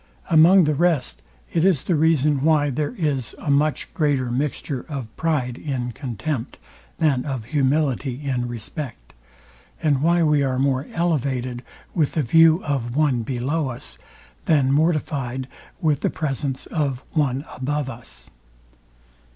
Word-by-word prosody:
Among 170 +4 +7
the 155 -1 +2
rest, 160 -3 +1 0.3
it 165 - +2
is 180 -7 +3
the 180 - 0
reason 150 -3 +3
why 150 -2 +3
there 150 - -2
is 140 - -1
a 145 - -2
much 150 +2 +1
greater 140 -6 +1
mixture 135 0 -2
of 135 -7 -6
pride 130 -7 -1
in 130 -5 -3
contempt, 130 +1 -4 0.4
than 140 -6 +2
of 130 -6 -4
humility 135 -1 0
in 125 -3 -1
respect, 120 - -7 0.7
and 145 -5 +1
why 170 +2 +3
we 150 -2 +3
are 130 -2 0
more 135 0 +1
elevated 130 -7 -1 0.3
with 155 -5 +1
the 155 - +1
view 165 +6 +5
of 130 -5 -2
one 145 -5 +2
below 135 +6 -1
us, 120 -1 -6 0.5
than 140 -4 +3
mortifyed 140 -4 0 0.3
with 150 -5 +2
the - - 0
presence 140 -3 -3
of 140 -5 -2
one 140 -2 0
above 145 +2 -2
us. 115 - -8
140 Hz, 140 wpm, -23 LUFS, 130-155 Hz, 0.7 s, Among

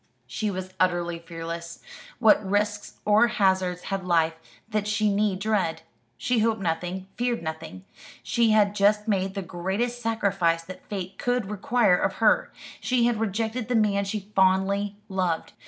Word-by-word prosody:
She 215 - -3
was 185 -1 -5
utterly 175 -2 +1
fearless. 170 0 -7 0.4
What 220 -3 +5
risks 205 +1 -1
or 210 +3 +5
hazards 190 -5 +1
had 195 -1 -2
life 165 -2 +2 0.3
that 215 -2 -1
she 210 -1 +1
need 205 -1 +1
dread? 190 -6 -1 0.3
She 245 -2 0
hoped 220 0 +1
nothing 180 +1 -2
feared 240 -4 -1
nothing. 160 - -6 0.4
She 235 -1 +2
had 210 -2 +4
just 210 +1 +2
made 195 -2 0
the 195 - -3
greatest 195 +8 -3
sacrifice 195 -7 +1
that 185 +2 -11
fate 190 -2 -5
could 245 -5 -1
require 210 -1 +3
of - - 0
her: - - +3 0.3
she 250 -2 +1
had 235 -2 +1
rejected 225 +2 -2
the 250 - 0
man 205 -2 +2
she 200 +1 -5
fondly 195 +2 +2
loved. 185 -4 -2
200 Hz, 155 wpm, -26 LUFS, 180-215 Hz, 0.4 s, What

